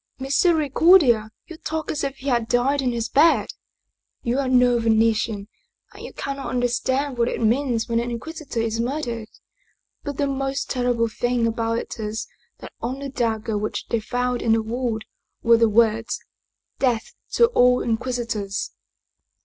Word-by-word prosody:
" - - -52
Misericordia! 285 - +4 0.2
you 335 -3 -10
talk 315 -1 -3
as 295 - -3
if 275 -1 -2
he 270 - -10
had 240 -4 +1
died 265 +4 +2
in 255 -2 0
his 230 -1 -2
bed! 305 +7 +4 0.7
You 245 +3 0
are 270 -2 0
no 250 -1 +4
Venetian, 220 -2 +1 0.5
and - - -11
you - - -7
cannot 275 0 -5
understand 250 +2 0
what 235 - +3
it - - -2
means 235 0 +1
when 230 -1 +1
an 240 +1 -2
Inquisitor 280 +2 -5
is 225 0 -2
murdered. 235 -3 -3 0.7
But 285 -2 -5
the 285 - +1
most 270 0 -2
ter 250 -1 +1
rible 230 -1 0
thing 245 -1 0
about 230 0 0
it 235 - -6
is 215 +1 -3 0.4
that - - -10
on 250 +3 -3
the 280 0 -5
dagger 220 -4 -1
which 210 - -4
they 230 - +1
found 245 +2 -2
in 225 - +3
the 225 0 +2
wound 230 -1 -3 0.4
were 230 0 +6
the 230 -1 +4
words: 225 +1 +2 0.3
' - - -51
Death 245 -4 0 0.2
to 470 - +6
all 250 - +4
Inquisitors 230 -4 -2
240 Hz, 170 wpm, -23 LUFS, 225-270 Hz, 0.7 s, were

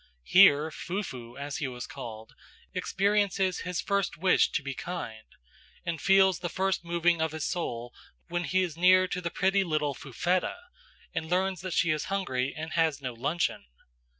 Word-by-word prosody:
Here 160 - +6
"Fufu," 130 - -5
as 140 0 -4
he 145 - -2
was 125 -1 -6
called, 110 -1 -9 0.4
experiences 195 -2 +1
his 180 -1 -3
first 200 -2 -1
wish 180 +3 +4
to - - 0
be 135 0 -4
kind, 120 -9 -6 0.6
and 170 -2 -3
feels 190 -2 +5
the 175 - -3
first 190 +2 0
moving 170 -1 +1
of 160 -1 0
his 160 -2 -3
soul 120 -9 -3 0.3
when 175 0 -2
he 185 +5 +2
is 170 -5 -4
near 185 +2 +5
to 180 -1 -3
the 170 - -2
pretty 195 +3 +2
little 155 -4 0
Fufetta, 175 - -1 0.6
and 160 -1 -3
learns 185 0 0
that 185 -1 -4
she 170 - +3
is 155 -1 -1
hungry 140 -10 -1
and 160 +1 -5
has 160 -3 +2
no 130 -3 -4
luncheon. 145 - -1
170 Hz, 170 wpm, -29 LUFS, 145-185 Hz, 0.6 s, Here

